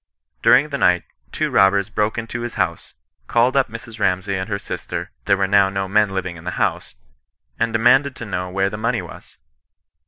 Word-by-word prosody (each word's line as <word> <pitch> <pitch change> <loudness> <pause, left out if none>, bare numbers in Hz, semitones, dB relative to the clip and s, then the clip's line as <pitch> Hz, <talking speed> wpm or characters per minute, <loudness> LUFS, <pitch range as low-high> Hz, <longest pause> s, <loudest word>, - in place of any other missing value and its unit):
During 140 +4 +5
the 140 -1 -3
night, 90 -1 +3 0.3
two - - -2
robbers 100 +1 +3
broke 105 +1 0
into 115 +1 -4
his 120 0 -5
house, - - -2 0.3
called 120 +3 +2
up 135 -2 +2
Mrs. 115 0 -10
Ramsay 95 0 0
and 95 +2 -3
her 100 - -1
sister 100 - -6
(there 100 -1 +3
were 95 - +1
no 95 0 +2
men 105 +1 +3
living 95 -2 -4
in 80 - -12
the - - -5
house), - - -1 0.6
and 115 0 +1
demanded 125 +4 +3
to 120 - -7
know 90 -3 -3
where 95 +1 0
the 105 - -5
money 110 - -1
was. - - -13
100 Hz, 190 wpm, -20 LUFS, 95-115 Hz, 0.6 s, During